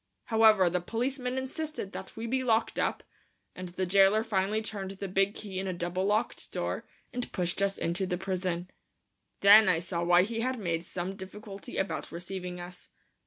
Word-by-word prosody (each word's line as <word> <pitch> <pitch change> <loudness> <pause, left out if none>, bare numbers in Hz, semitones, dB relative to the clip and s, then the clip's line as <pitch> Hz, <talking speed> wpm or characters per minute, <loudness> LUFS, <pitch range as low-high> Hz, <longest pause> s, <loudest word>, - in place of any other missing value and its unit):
However, 220 -4 +5
the 180 +1 0
policeman 250 +5 -2
insisted 265 -4 -4
that - - -8
we 225 - -4
be 260 +3 0
locked 230 -2 +1
up, - - 0 0.5
and 185 -1 -6
the 185 +2 -2
jailer 195 +3 +5
finally 210 +1 0
turned 200 -3 -4
the 195 0 -5
big 195 +2 +1
key 195 -3 -5
in 190 - -3
a 185 - -1
double 175 +2 -2
locked 215 +3 -1
door - - -3 0.3
and 245 0 -4
pushed 180 +1 -1
us 200 0 +1
into 175 +3 -1
the 180 - -1
prison. 185 -1 -2 0.7
Then 205 0 +9
I 170 - +4
saw 170 0 -3
why 175 +1 +6
he 225 +3 -3
had 255 +2 0
made 170 -6 -2
some 180 +2 -4
difficulty 195 +1 -8
about 160 -6 -2
receiving 180 +1 -5
us. 175 +1 -9
195 Hz, 180 wpm, -30 LUFS, 180-220 Hz, 0.7 s, Then